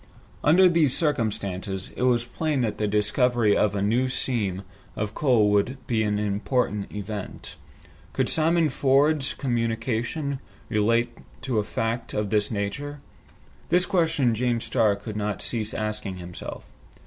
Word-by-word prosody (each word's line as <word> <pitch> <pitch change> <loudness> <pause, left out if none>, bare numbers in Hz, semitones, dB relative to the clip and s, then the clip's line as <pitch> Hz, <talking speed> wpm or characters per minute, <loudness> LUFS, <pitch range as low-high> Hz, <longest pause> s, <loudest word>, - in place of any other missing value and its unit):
Under 180 +5 +6
these 165 -6 +3
circumstances, 100 - -2
it - - -6
was 120 -2 +2
plain 150 +2 -1
that 110 -3 -2
the 105 - +1
discovery 105 +2 +2
of 105 -1 +2
a 100 - 0
new 120 +5 +2
seam 105 -7 0 0.3
of 105 0 -3
coal 115 -8 +3
would 105 +6 +1
be 115 -2 0
an 105 -1 0
important 105 +1 -1
event. 105 -1 -6 0.6
Could - - 0
Simon 160 0 +3
Ford's 140 +2 +2
communication 120 +3 -2 0.3
relate 115 +2 +2 0.3
to 125 -4 0
a - - 0
fact 115 +3 -3
of 105 -2 -1
this 105 -1 +2
nature? 115 +8 -3 0.7
This 180 +1 +4
question 160 - +2
James 120 0 0
Starr 110 -5 +2
could 105 +2 -8
not 105 -2 -2
cease 110 -2 -2
asking 105 -2 -3
himself. 90 -1 -8
115 Hz, 140 wpm, -25 LUFS, 105-130 Hz, 0.7 s, Under